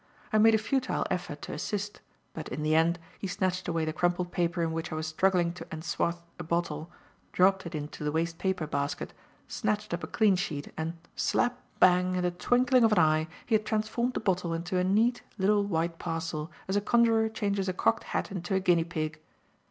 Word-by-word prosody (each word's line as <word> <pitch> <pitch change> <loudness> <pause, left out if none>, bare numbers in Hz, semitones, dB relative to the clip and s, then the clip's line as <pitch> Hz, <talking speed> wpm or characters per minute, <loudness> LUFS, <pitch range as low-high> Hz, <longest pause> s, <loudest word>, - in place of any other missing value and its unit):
I 215 - +5
made 225 +1 +7
a - - +5
futile 255 +4 0
effort - - -3
to - - -5
assist, 205 -1 -4 0.3
but 160 - -6
in 150 +4 -4
the 155 +1 +2
end, 165 +2 +3 0.2
he 195 - -3
snatched 185 -1 -1
away 165 -2 0
the 155 - -2
crumpled 175 +2 0
paper 170 0 0
in 165 - 0
which 165 +1 -4
I - - -2
was 155 0 -2
struggling 175 +1 +2
to 175 - -8
enswathe 170 +1 -1 0.2
a - - -4
bottle, 170 -1 -2 0.4
dropped 190 0 +3
it 170 - -6
into 150 0 -5
the 150 - 0
waste 165 +1 -1
paper 190 -4 0
basket, 140 -1 -3 0.3
snatched 210 -3 -2
up 170 - -3
a - - -3
clean 215 -4 +3
sheet 155 -6 -4
and 160 +2 -3 0.2
slap! 245 +1 +1 0.2
bang! 180 0 +5
in 180 - 0
the 180 - +1
twinkling 245 +7 +3
of 225 -1 +5
an - - +2
eye, 155 0 +3 0.2
he 230 - -2
had 215 -1 +4
transformed 230 +3 0
the - - +1
bottle 180 -5 0
into 175 +2 -1
a - - +2
neat, 220 +6 +2 0.2
little 205 +1 +3
white 165 -3 -1
parcel 165 -2 -3 0.2
as 190 - -1
a 205 - +3
conjuror 225 0 +3
changes 200 -3 -1
a - - +2
cocked - - +1
hat - - -2
into 185 0 -2
a - - +3
guinea 175 -3 +3
pig. 160 -2 -4
180 Hz, 210 wpm, -29 LUFS, 165-205 Hz, 0.4 s, made